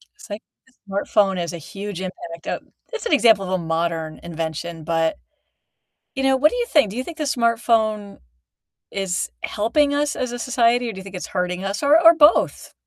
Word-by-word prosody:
It's 420 - -15
like 205 +2 -6 0.3
the 260 - -27 0.2
smartphone 195 -1 +1
is 170 0 -4
a - - -5
huge 195 +3 -7
impact 170 -2 -8
o - - -2 0.3
it's 470 - -5
an 405 - 0
example 225 -8 +5
of 185 - -5
a 185 - +2
modern 165 -1 -2
invention, 165 0 -5
but, 165 0 0 1.0
you 270 - -2
know, 270 0 +3
what 300 +3 +5
do - - -4
you 485 - 0
think? 290 - +3
Do 215 - -8
you 255 - -2
think 335 -1 -9
the 305 - -1
smartphone 230 -5 +1 0.7
is 190 -2 -2
helping 285 +7 +1
us 295 +1 0
as 250 -2 -3
a 245 - -4
society 240 -1 +2
or 225 - -5
do - - -11
you 190 - -7
think 195 -1 -10
it's 180 - -5
hurting 180 0 -2
us, 195 +5 -3
or 290 +3 +5
or 335 0 +8
both? 320 0 +3
205 Hz, 205 wpm, -22 LUFS, 180-265 Hz, 1.0 s, or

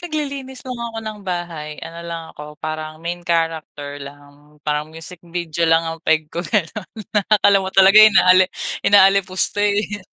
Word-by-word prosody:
naglilinis 280 -6 -5
lang 255 -2 -6
ako 230 -1 -5
ng 215 -1 -6
bahay 175 -5 -5
ano 165 +1 -9
lang 170 -1 -6
ako, 150 0 -11
parang 155 0 -6
main 175 +1 -4
character 160 -4 -3
lang. 145 +1 -14
Parang 150 0 -2
music 165 +2 -10
video 170 -1 -2
lang 165 0 +3
ang 165 0 -5
peg 160 0 +1
ko 170 - -3
ganon, 200 +1 -2
na 220 - -7 0.4
akala 200 0 +4
mo 190 - -4
talaga 195 +2 +7
inaali 185 -3 +6 0.3
inaalipusta, 195 0 +3
eh. 205 0 0
175 Hz, 160 wpm, -20 LUFS, 155-205 Hz, 0.4 s, talaga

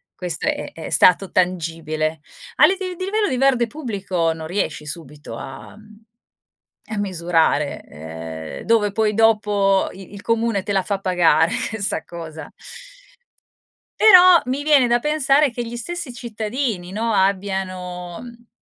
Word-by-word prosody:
questo 175 -3 -4
è - - -2
è 165 - -8
stato 185 +1 +4
tangibile. 165 -3 -1 0.3
A - - +7
liv 385 - +2
di 370 -1 -5
livello 420 +2 0
di 255 - -1
verde 255 -3 +3
pubblico 200 - -2
non 160 -1 -8
riesci 160 -4 -3
subito 150 -5 -8
a 135 +9 -10 1.1
a 215 - -3
misurare, 170 -6 0
ehm, 80 +1 -8
dove 220 -3 +2
poi 215 +1 +1
dopo 210 -3 +2
i 190 +1 -13
il 200 - -9
comune 230 -3 0
te 205 - -4
la 195 - +2
fa 200 0 -2
pagare 170 -4 +3 0.3
sta 195 -5 0
cosa. 160 -3 -9 1.5
Però 365 -4 +8
mi 265 +3 -2
viene 290 -4 +4
da 240 0 +2
pensare 300 0 +2
che 240 0 -5
gli 235 - -7
stessi 310 +3 -5
cittadini, 220 -4 -4
no, 225 +2 -1
abbiano, 185 -3 -2
mhmm, 235 -1 -13
200 Hz, 140 wpm, -21 LUFS, 170-240 Hz, 1.5 s, Però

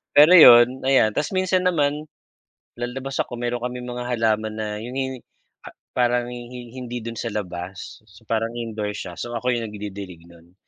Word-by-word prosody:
Pero 150 +4 +8
yun, 125 -5 +8
ayan, 130 -5 +4
tas 150 +4 -1
minsan 185 0 +1
naman, 150 -2 0 0.7
lalabas 130 +2 -4
ako 120 - -6
meron 120 0 -1
kaming 125 0 -5
mga 125 0 -5
halaman 110 -2 0
na 110 -1 -3
yun 120 +2 -7
yung 130 -1 -2 0.5
pa - - -9 0.3
parang 120 -1 +2
hi-hin 120 0 -9 0.2
hindi 120 0 -5
dun 115 -1 -6
sa 115 - -3
labas. 90 -1 -6 0.3
Parang 115 +1 -1
indoor 110 -3 -4
siya, 85 - -7
so 120 - -5
ako 125 +2 -1
yung 115 -1 -3
nagdidilig 100 -4 -8
nun. 85 +1 -19
120 Hz, 170 wpm, -23 LUFS, 110-125 Hz, 0.7 s, Pero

